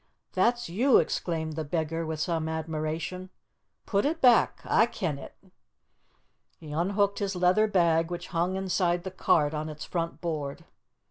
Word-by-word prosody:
"That's 240 0 +2
you!" 235 +10 +4
exclaimed 160 -2 -1
the 160 - -2
beggar, 160 +1 -2
with 160 -1 -4
some 160 0 -1
admiration. 160 +3 -4 0.6
"Put 200 -1 +1
it 320 +3 0
back. 245 -5 +4
A' 225 - +4
ken 165 -11 -3
it." - - -11 1.2
He 155 -3 -11
unhooked 200 +5 +1
his 200 -2 -2
leather 180 +4 +3
bag, 170 -4 +2
which 175 0 -6
hung 175 +2 0
inside 180 -2 0
the 190 - -5
cart 150 -4 +2
on 155 0 -3
its 150 -1 -7
front 170 -1 -3
board. 150 -5 -4
170 Hz, 150 wpm, -28 LUFS, 160-190 Hz, 1.2 s, you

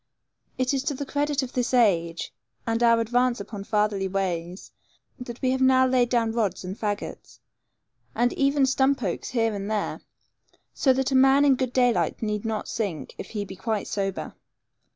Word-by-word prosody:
It 255 +1 0
is 270 - 0
to 285 - -1
the 285 - -4
credit 290 0 -1
of 255 - -7
this 250 0 0
age, 170 -8 +1 0.3
and 230 0 -1
our 230 -1 +5
advance 245 +1 +1
upon 200 0 -7
fatherly 210 -3 0
ways, 180 -2 -3 0.5
that 245 0 -8
now - - +2
we - - +3
have 260 0 +4
laid 245 -2 +3
down 230 -2 +1
rods 210 -6 -1
and 185 +1 -5
fagots, 205 -1 -5 0.8
and 245 0 +2
even 275 0 +2
stump 265 0 +1
oaks 180 -4 -3
here 225 -3 +1
and 200 0 -4
there, 215 -1 -2 0.7
so 270 - +3
that 265 +1 0
a - - +1
man 270 +2 +5
in 280 - +6
good 255 -1 -1
daylight 245 -2 +1
need 210 0 -2
not 220 -1 -2
sink, 195 -9 -4
if - - -7
he 210 -2 -4
be 190 - -9
quite 210 +2 -2
sober. 195 -2 -3
235 Hz, 180 wpm, -25 LUFS, 205-260 Hz, 0.8 s, in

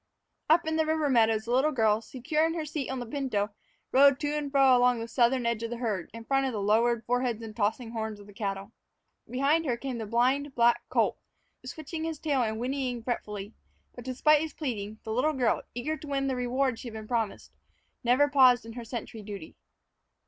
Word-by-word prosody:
Up 330 +2 +5
in 320 0 -1
the 315 - +2
river 310 -2 +1
meadows, 220 -3 +3
the 235 - -4
little 265 +5 +3
girl, 220 -4 +2
secure 270 +7 -1
in 325 +1 +1
her 320 -2 -3
seat 295 -2 -4
on 265 - -3
the 245 - -5
pinto, 225 -6 -2 0.4
rode 275 0 +6
to 290 - 0
and 290 -2 -3
fro 270 -2 +6
along 245 -1 +3
the 230 - -5
southern 245 +1 +2
edge 235 -1 0
of 230 - -3
the 240 - -4
herd, 215 -7 -2
in 230 0 -10
front 270 +1 +1
of 260 - -3
the 215 - -2
lowered 225 +3 +2
foreheads 245 -1 0
and 215 -1 -8
tossing 225 +2 -1
horns 220 -2 -4
of 205 - -13
the 205 - -14
cattle. 195 0 -4 0.6
Behind 280 +6 +2
her 245 -4 0
came 255 -1 -5
the 220 - -5
blind 260 +5 +1
black 235 0 +4
colt, - - +1 0.4
switching 315 0 -6
his 325 -1 -3
tail 285 -3 0
and 220 -2 -1
whinnying 250 -1 -2
fretfully; 210 -3 -4 0.4
but, 245 - -10
despite 290 +4 +3
his 315 -2 -4
pleading, 220 -7 -4
the 220 - -4
little 280 +7 +2
girl, 250 -5 +1
eager 295 +6 -2
to 305 - -11
win 275 -1 -1
the 265 -1 0
reward 250 0 0
she - - -8
had 230 - -8
been 220 -1 -8
promised, 225 -3 -2 0.5
never 250 +4 +4
paused 255 -4 +5
in 225 - -8
her 240 0 -7
sentry 230 -1 -6
duty. 200 -5 -8
245 Hz, 215 wpm, -28 LUFS, 225-275 Hz, 0.6 s, rode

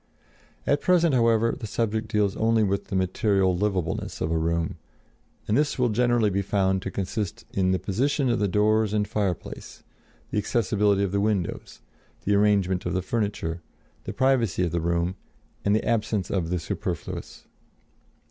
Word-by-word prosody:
At 145 0 +2
present, 170 -4 +3
however, 115 -2 +3
the 110 - -5
subject 110 0 -1
deals 105 -3 +1
only 110 0 +2
with 100 -1 0
the - - -5
material 95 0 +2
livableness 95 -3 -2
of 80 - -1
a - - +1
room, 85 0 -1 0.7
and 105 - +1
this 150 +3 +1
will 125 -2 +2
generally 120 -1 +2
be 100 +1 0
found 95 -1 +1
to 95 - -4
consist 100 0 -4
in 95 -1 +1
the 95 - +2
position 135 +9 0
of 120 -1 +1
the 105 - +2
doors 105 +2 +2
and 105 -1 +1
fireplace, 100 -5 -4 0.5
the - - +1
accessibility 105 -2 +1
of 100 - -1
the 100 0 +1
windows, 100 -4 -2 0.4
the 105 - +2
arrangement 100 -3 +2
of 90 - -2
the 95 - 0
furniture, 100 -7 -2 0.4
the - - -3
privacy 120 -9 +2
of 85 - -1
the 85 - -1
room 85 +2 0 0.5
and 100 +1 +3
the 110 - 0
absence 110 -4 0
of 90 -4 -1
the 90 - 0
superfluous. 85 - -5
105 Hz, 165 wpm, -25 LUFS, 95-110 Hz, 0.7 s, present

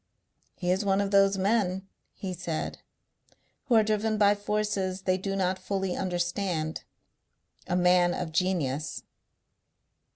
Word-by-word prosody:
"He 180 0 -1
is 190 +3 +1
one 195 -1 +2
of 200 -1 0
those 195 0 +4
men," 190 -2 +1 0.3
he 190 -2 -5
said, 170 -2 -4 0.9
"who 255 -4 +2
are 220 - +6
driven 215 0 0
by 205 -1 +5
forces 205 -2 -2
they 185 -1 +2
do 195 +1 -3
not 185 -1 0
fully 190 -1 -2
understand. 175 -3 -2 0.8
A 180 - 0
man 180 0 +4
of 175 -3 -4
genius." 160 -5 -1
190 Hz, 130 wpm, -28 LUFS, 180-200 Hz, 0.9 s, are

